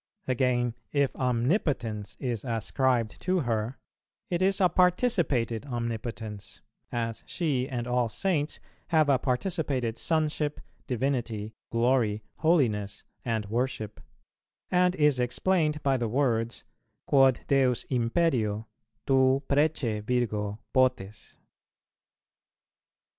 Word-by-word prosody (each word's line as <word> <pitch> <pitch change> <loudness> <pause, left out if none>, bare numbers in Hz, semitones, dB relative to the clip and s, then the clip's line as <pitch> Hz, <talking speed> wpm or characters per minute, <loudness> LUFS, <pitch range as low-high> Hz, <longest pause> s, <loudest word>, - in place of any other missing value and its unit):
Again, 125 -2 +1 0.2
if 140 -2 +1
omnipotence 120 - -1
is 120 -5 -2
ascribed 120 -1 0
to 185 -1 +1
her, 115 0 -2 0.5
it 175 0 0
is 195 +1 +2
a 185 - +6
participated 175 - +2
omnipotence 115 -3 -5 0.3
(as 115 -2 -3
she 140 -6 -1
and 120 -3 -3
all 125 -1 +1
Saints 155 - -1 0.3
have 155 -3 +3
a 135 -2 +4
participated 130 - -1
sonship, 155 -2 0 0.3
divinity, 120 -5 -2 0.2
glory, 115 -3 +2
holiness, 110 - +1 0.2
and 115 -3 -1
worship), 110 -1 -3 0.7
and 180 0 +3
is 150 -5 +3
explained 150 +4 +1
by 135 -2 +2
the 120 -2 -1
words, 120 -2 0 0.4
"Quod 135 -3 +4
Deus 130 -3 +2
imperio, 115 -4 +1 0.4
tu 135 0 +3
prece, 140 -7 +1
Virgo, 105 -3 -1 0.2
potes." 115 -6 0
125 Hz, 100 wpm, -28 LUFS, 115-145 Hz, 0.7 s, a